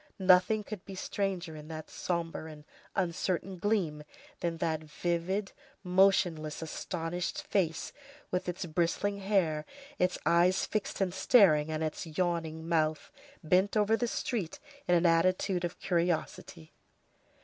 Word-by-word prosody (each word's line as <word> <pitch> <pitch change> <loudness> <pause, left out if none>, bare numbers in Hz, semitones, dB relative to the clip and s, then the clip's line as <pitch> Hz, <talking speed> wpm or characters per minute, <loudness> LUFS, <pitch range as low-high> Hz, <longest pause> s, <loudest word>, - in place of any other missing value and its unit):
Nothing 190 +2 +4
could 200 -2 -7
be 195 - -9
stranger, 185 -4 -3
in 150 0 -10
that 155 -1 -8
sombre 170 -2 -3
and 150 -1 -12 0.3
uncertain 185 +1 -1
gleam, 175 -7 0 0.4
than 170 -1 -2
that 160 -1 -1 0.2
livid, 180 +4 0 0.3
motionless, 180 -5 +2
astonished 170 +2 -3
face, 170 -5 -1 0.4
with 180 0 -1
its 180 +2 -4
bristling 175 +5 0
hair, 185 -6 +1 0.4
its 180 0 +2
eyes 175 +2 +4
fixed 215 -1 -3
and 185 -2 +1
staring, 175 -9 +5
and 155 0 -2
its 155 +2 -3
yawning 165 -1 -2
mouth, 155 -2 0 0.3
bent 185 +6 +3
over 210 +1 +4
the 240 +1 -1
street 220 -7 -2 0.3
in 175 - +4
an 170 +1 +3
attitude 180 +2 +2
of 175 0 -3
curiosity. 170 - -2
175 Hz, 130 wpm, -31 LUFS, 160-190 Hz, 0.4 s, staring